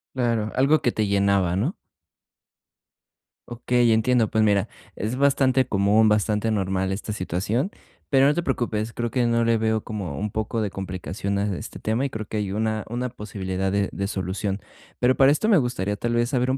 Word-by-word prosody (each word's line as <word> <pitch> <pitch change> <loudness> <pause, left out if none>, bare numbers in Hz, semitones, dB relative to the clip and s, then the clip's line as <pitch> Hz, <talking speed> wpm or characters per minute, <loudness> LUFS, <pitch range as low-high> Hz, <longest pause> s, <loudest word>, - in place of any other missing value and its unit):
Claro, 115 -4 0
algo 140 +4 +4
que 120 - +2
te 110 -2 -1
llenaba, 100 -3 +2
¿no? 125 - -1 1.7
Okey, 120 0 +1
entiendo, 115 +1 +3
pues 110 - +1
mira, 105 -1 +2 0.3
es 110 +5 -3
bastante 135 -2 +3
común, 105 +2 +3
bastante 105 +1 +1
normal 95 -2 0
esta 105 +2 -5
situación, 105 - -2 0.4
pero 135 -2 +5
no 145 - +4
te 175 - -1
preocupes, 115 -6 -2
creo 120 -1 -3
que 125 -2 +1
no 115 0 +2
le 115 0 +3
veo 110 -1 0
como 95 -10 -5
un 105 0 -3
poco 110 +1 -2
de 105 - -1
complicación 95 +1 -4
a 100 -2 -1
este - - -8
tema, 115 +5 0
y 140 - -1
creo 110 -2 -5
que 110 - -5
hay 100 -2 -2
una 110 0 -1
una 125 +2 -2
posibilidad 95 -4 -4
de 100 0 0
de 100 0 -3
solución. 95 0 -3 0.4
Pero 125 +1 +3
para 135 0 +6
esto 215 +8 0
me 200 - +6
gustaría 110 -7 -1
tal 120 +2 -2
vez 120 +1 +1
saber 125 -2 0
un 135 - 0
110 Hz, 190 wpm, -24 LUFS, 100-120 Hz, 1.7 s, para